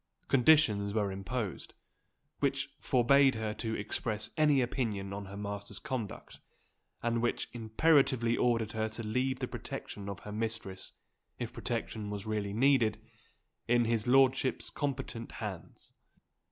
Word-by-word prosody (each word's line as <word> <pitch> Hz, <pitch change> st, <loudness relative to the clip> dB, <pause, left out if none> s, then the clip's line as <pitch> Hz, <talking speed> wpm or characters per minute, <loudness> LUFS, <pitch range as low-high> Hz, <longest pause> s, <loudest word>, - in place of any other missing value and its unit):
Conditions 115 Hz, -7 st, +4 dB
were 105 Hz, -3 st, +1 dB
imposed, 100 Hz, +1 st, -4 dB, 0.6 s
which -, -, 0 dB
forbade 135 Hz, +2 st, +4 dB
her 110 Hz, -1 st, -2 dB
to 110 Hz, 0 st, -3 dB
express 105 Hz, +1 st, -3 dB
any 150 Hz, -3 st, +4 dB
opinion 110 Hz, -6 st, -1 dB
on 100 Hz, 0 st, -5 dB
her 100 Hz, +1 st, -8 dB
master's 100 Hz, 0 st, -5 dB
conduct, 130 Hz, -7 st, -5 dB, 0.6 s
and 115 Hz, 0 st, +1 dB
which 120 Hz, -, -1 dB
imperatively 120 Hz, 0 st, +3 dB
ordered 115 Hz, -3 st, +1 dB
her 110 Hz, 0 st, -1 dB
to 115 Hz, +1 st, -6 dB
leave 125 Hz, +4 st, 0 dB
the -, -, -3 dB
protection 100 Hz, -1 st, -6 dB
of 100 Hz, -, -6 dB
her 105 Hz, -, -8 dB
mistress 110 Hz, -3 st, -4 dB, 0.4 s
if -, -, -5 dB
protection 105 Hz, -2 st, -3 dB
was 100 Hz, -1 st, -5 dB
really 105 Hz, -2 st, -2 dB
needed 115 Hz, -2 st, +3 dB, 0.7 s
in 120 Hz, 0 st, +4 dB
his 115 Hz, 0 st, 0 dB
lordship's 135 Hz, 0 st, +3 dB
competent 135 Hz, -5 st, -3 dB
hands. 105 Hz, -9 st, -7 dB
115 Hz, 130 wpm, -32 LUFS, 105-130 Hz, 0.7 s, Conditions